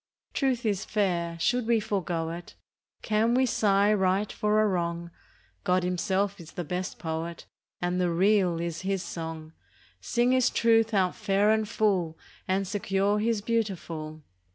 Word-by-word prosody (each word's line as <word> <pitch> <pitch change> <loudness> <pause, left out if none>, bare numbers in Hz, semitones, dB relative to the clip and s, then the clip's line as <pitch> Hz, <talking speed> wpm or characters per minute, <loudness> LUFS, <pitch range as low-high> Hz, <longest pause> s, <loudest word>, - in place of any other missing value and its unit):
Truth 260 -4 0
is 205 -2 0
fair; 175 -5 -1
should 245 +6 +1
we 235 -1 +4
forego 180 -6 -2
it? 175 +1 -9 0.5
Can 220 +2 +2
we 260 +1 +4
sigh 205 -3 +3
right 195 +1 +1
for 210 0 +1
a - - +3
wrong? 170 -2 -2 0.5
God 180 0 +2
Himself 190 +2 0
is 165 -2 -12
the 175 - -4
best 180 +3 -4
Poet, 165 0 -4 0.4
And 180 +1 0
the 180 - +2
Real 185 0 +3
is 170 -1 -3
His 190 -1 -1
song. 160 -1 -6 0.5
Sing 240 +1 +1
His 255 -1 +4
Truth 225 -1 +3
out 185 -2 +2
fair 200 +2 +2
and 220 -1 +1
full, 190 -8 +1 0.3
And 190 +1 0
secure 200 +1 0
His 225 -1 0
beautiful. 170 -9 -3
195 Hz, 155 wpm, -27 LUFS, 170-215 Hz, 0.5 s, we